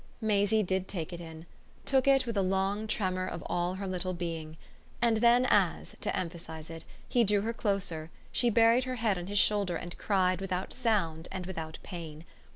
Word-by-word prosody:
Maisie 215 -1 +2
did 190 0 -1
take 175 -2 -4
it 175 - -6
in 160 -1 -9 0.4
took 265 -1 +3
it 270 -1 +5
with 230 -2 -3
a 200 - +3
long 195 +3 0
tremor 185 -3 -1
of - - -5
all 175 +1 -1
her 195 +1 -5
little 185 -1 -2
being; 165 -2 -5 0.4
and 235 -2 +3
then 240 +2 +5
as, 195 -7 +2
to - - -1
emphasise 165 -2 -6
it, 165 0 -8 0.2
he 240 - +3
drew 205 -1 +3
her 225 +3 -2
closer 195 -8 -2 0.2
she 240 - +2
buried 230 +3 +5
her 255 0 -3
head 220 -6 +1
on 175 - -6
his 205 +1 -2
shoulder 200 -3 +3
and 175 +1 -6
cried 185 -2 +2
without 185 -1 -2
sound 185 -10 0
and 185 -1 -4
without 160 -3 -5
pain. 165 -3 -8
190 Hz, 190 wpm, -30 LUFS, 175-215 Hz, 0.4 s, it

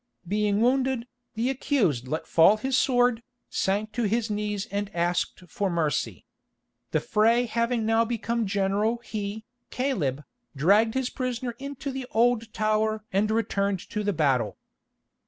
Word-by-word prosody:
Being 205 +1 +1
wounded, 260 0 +2 0.3
the 235 +4 +1
accused 195 - 0
let 155 +4 -3
fall 180 +6 +5
his 265 +4 -1
sword, 245 -3 +3 0.3
sank 205 +3 0
to 235 +1 -1
his 220 +1 0
knees 210 -1 -2
and 200 0 -2
asked 175 +1 -1
for 195 +4 -2
mercy. 160 -5 -1 0.6
The - - +1
fray 230 +3 +3
having 235 0 0
now 225 +1 +3
become 230 -1 -1
general 200 +3 +1
he, 215 0 -5 0.2
Caleb, 160 - -1 0.3
dragged 205 - +3
his 265 -1 -1
prisoner 255 -2 -3
into 280 +1 -5
the 265 -1 -5
Old 230 0 +2
Tower 215 0 0
and 205 +2 +2
returned 200 -3 0
to 210 -1 -2
the 205 - +1
battle. 135 - +1
215 Hz, 140 wpm, -26 LUFS, 200-240 Hz, 0.6 s, fall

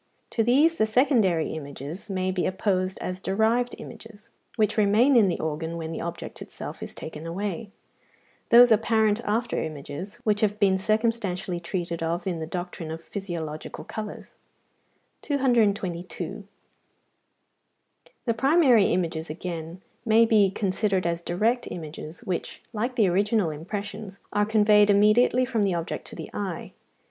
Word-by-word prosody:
To 225 - +1
these 295 +8 +3
the 220 - +3
secondary 215 - +2
images 150 +5 -7
may 185 -1 -1
be 185 -1 0
opposed 185 -1 0
as 185 0 -4
derived 220 +5 +1
images, 220 -2 -12 0.2
which 215 -3 +1
remain 220 +6 +4
in 220 -5 +6
the 175 - -1
organ 160 +2 -3
when 160 -1 -5
the 160 - -4
object 170 0 -6
itself - - -8
is - - -7
taken 160 0 -7
away; 200 +5 -4 0.8
those 240 +1 +8
apparent 220 0 +3
after 225 +3 0
images, 155 +5 -6
which 210 -1 +1
have 210 -1 +1
been 190 -2 +3
circumstantially 215 -4 0
treated 170 -1 -4
of 170 +2 -2
in 180 -4 -2
the 160 - -4
doctrine 175 -1 -5
of 165 +1 -6
physiological 165 -7 -6
colours. 215 -2 -7 0.8
222. 210 - 0 1.8
The 230 - +2
primary 265 - +5
images, 165 -3 -1
again, 165 +2 -6 0.2
may 230 0 +5
be 215 -3 +4
considered 195 -1 0
as 170 0 -1
direct 220 +9 0
images, 160 +3 -8
which, 185 -6 -4
like 240 +4 -2
the 215 -5 +4
original 200 0 +2
impressions, 200 +5 -6 0.2
are 205 0 +2
conveyed 210 -1 +5
immediately 215 +5 +4
from 240 -4 -1
the 195 -3 +1
object 170 -1 -4
to - - -10
the - - -8
eye. 195 -5 -4
200 Hz, 140 wpm, -26 LUFS, 170-220 Hz, 1.8 s, those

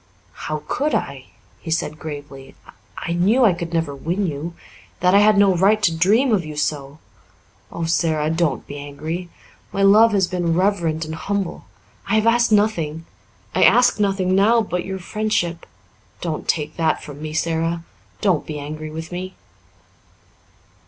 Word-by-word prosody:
"How 155 -1 -5
could 295 +3 0
I 140 - -1
dare?" 135 -2 -12 0.4
he 165 - -9
said 155 -1 -2
gravely. 145 -3 -9 0.4
"I 170 - -3
knew 210 +9 +3
I 200 - +5
could 170 -1 -5
never 165 -4 -1
win 175 +8 -2
you 165 +1 -4 0.4
that 180 +1 +3
I 200 - +7
had 210 0 +5
no 200 -2 +5
right 200 +5 +4
to 170 -4 +3
dream 220 +10 +3
of 190 -4 +2
you 155 -1 -7
so. 145 -1 -3 0.7
Oh, 170 - -3
Sara, 160 -2 +1
don't 165 -4 0
be 145 - -8
angry! 155 +5 -6 0.4
My 195 - 0
love 215 +3 +6
has 195 -2 +3
been 175 -2 -1
reverent 170 -4 0
and 155 - -6
humble. 195 +3 -3 0.4
I 200 - +1
have 220 0 +2
asked 235 0 +3
nothing. 165 -7 +1 0.5
I - - +1
ask 245 -2 +5
nothing 195 -2 +1
now 210 +5 +4
but 180 -3 -3
your 190 0 -4
friendship. 185 -3 -2 0.5
Don't 160 -3 -4
take 155 -1 -1
that 160 -2 0
from 145 -1 -10
me, 155 0 -5
Sara. 165 +1 -1 0.4
Don't 185 -7 +2
be 155 - -5
angry 155 +2 -6
with 160 +2 -7
me." 185 +1 -6
170 Hz, 165 wpm, -21 LUFS, 155-200 Hz, 0.7 s, I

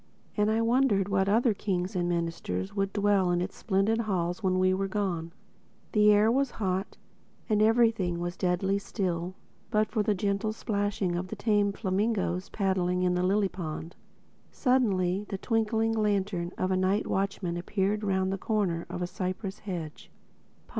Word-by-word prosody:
And 210 0 +2
I 220 +1 +2
wondered 230 -5 +2
what 195 0 +2
other 230 +2 +3
kings 190 -2 -2
and 175 -1 0
ministers 165 - -2
would 195 0 0
dwell 200 -2 +2
in 175 0 +2
its 180 +2 -3
splendid 210 +2 +1
halls 185 -3 -1
when 185 -2 +1
we 185 0 +3
were 195 +1 -1
gone. 185 -5 -2 0.6
The 210 -1 +5
air 210 +2 +5
was 275 +2 +2
hot; 190 -1 -2 0.5
and 215 -2 +2
everything 220 -6 +3
was 175 +1 -3
deadly 190 +2 0
still 185 -3 -3 0.3
but 215 -1 +1
for 220 - +1
the 210 0 +1
gentle 200 +3 -1
splashing 205 -5 -1
of 180 +1 -3
the 220 - -6
tame 205 -1 +2
flamingoes 195 -2 -1
paddling 185 -2 0
in 180 -1 +2
the 180 - +1
lily 195 +2 +2
pond. 165 -2 -6 0.6
Suddenly 205 - +1
the 195 - -3
twinkling 225 +1 +1
lantern 200 -5 0
of 185 - 0
a - - +2
night 190 +3 +1
watchman 195 -3 -1
appeared 195 +4 -1
round 190 -1 +1
the 195 - -4
corner 190 -7 -1
of 180 - -4
a - - +1
cypress 185 +2 -4
hedge. 170 -6 -6
195 Hz, 165 wpm, -28 LUFS, 180-210 Hz, 0.6 s, The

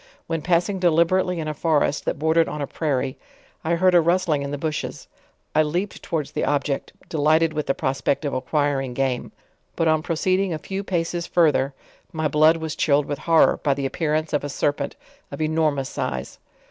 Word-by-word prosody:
When 165 -1 -2
passing 180 +4 +1
deliberately 175 +1 +2
in 155 - -3
a 155 - -2
forast 150 -1 +1
that - - -1
bordered 160 +2 +2
on 150 - -5
a 145 - -1
prairie, 135 -4 -2 0.4
I 170 +2 +1
heard 185 +2 +3
a 175 - +7
rustling 170 -3 +1
in 140 - -4
the 145 - -3
bushes; 155 +1 -4 0.5
I 155 - +4
leaped 175 +6 -2
towards 155 -4 -3
the - - -2
object, 145 -1 -1 0.2
delighted 155 +1 +2
with 150 -1 -3
the 135 - +1
prospect 135 +3 -1
of 140 - -2
acquiring 135 -1 -1
game. 130 -2 -1 0.4
But 165 - +1
on 155 -1 +3
proceeding 185 +2 0
a - - -3
few 195 +5 -5
paces 175 -2 -2
further, 145 -5 +2 0.4
my 160 -1 -1
blood 155 +3 +4
was 160 -1 -4
chilled 145 -1 +2
with 145 -1 -4
horror, 165 -1 +5
by 140 -3 +2
the 140 0 -3
appearance 155 +2 -1
of 145 - +1
a 145 - -3
serpent 145 +1 -1 0.4
of - - -7
an 155 - +1
enormous 155 -4 0
size. - - -4
155 Hz, 190 wpm, -23 LUFS, 145-165 Hz, 0.5 s, a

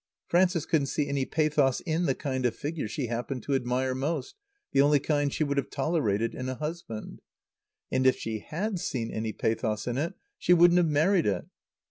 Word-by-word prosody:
Frances 175 -2 +2
couldn't 145 -4 +1
see 145 +1 -1
any 140 -1 0
pathos 150 -4 +2
in 170 0 0
the 135 - +2
kind 130 -3 -1
of 115 - -3
figure 150 -4 -3
she 125 +5 -3
happened 120 +1 -3
to 140 - -2
admire 130 0 0
most, 150 - -2 0.4
the 135 - +4
only 145 +1 +5
kind 145 0 0
she 155 - 0
would 140 -1 -1
have 140 - 0
tolerated 120 -8 0
in 130 0 -4
a 130 - -3
husband. 150 -6 -6 0.7
And 130 0 +3
if 130 - +4
she 110 -1 -4
had 190 - -3
seen 115 -8 -3
any 110 0 -2
pathos 110 -1 -1
in 125 +1 -1
it 165 +4 -2 0.2
she 180 - +5
wouldn't 175 +1 +6
have 175 - +3
married 160 - +3
it. 95 -4 0
140 Hz, 195 wpm, -28 LUFS, 125-160 Hz, 0.7 s, wouldn't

